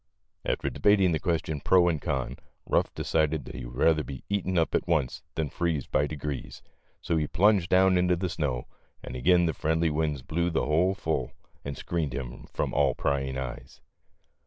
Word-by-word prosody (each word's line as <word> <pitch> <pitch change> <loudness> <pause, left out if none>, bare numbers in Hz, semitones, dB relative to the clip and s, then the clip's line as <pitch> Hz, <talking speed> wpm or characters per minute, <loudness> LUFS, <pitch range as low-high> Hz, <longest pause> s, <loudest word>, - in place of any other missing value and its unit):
After - - -1
debating 100 -3 +4
the 80 - 0
question 80 -5 -1
pro 90 +1 +5
and 80 -4 0
con, 70 -6 -2 0.3
Ruff - - +1
decided 80 -1 0
that - - -9
he - - -6
would - - -9
rather 80 +3 +3
be 65 -3 -8
eaten 95 -2 0
up 80 - +2
at - - 0
once 80 -7 0
than 80 -2 -1
to - - -24
freeze 80 -6 0
by 75 - +1
degrees, 75 -2 -5 0.4
so 85 - 0
he 75 -1 0
plunged 95 +1 +3
down 95 0 +5
into 90 0 +3
the 90 +2 -2
snow, 75 -8 -2 0.4
and - - -7
again 85 +7 +4
the 80 - 0
friendly 80 0 +1
winds 75 -3 -1
blew 85 +5 0
the 85 - 0
hole 90 +6 +2
full 80 -9 -2 0.3
and 70 0 -5
screened 80 -7 -2
him - - -6
from - - -2
all - - +3
prying 65 -1 -1
eyes. 65 -2 -7
80 Hz, 190 wpm, -28 LUFS, 70-85 Hz, 0.4 s, pro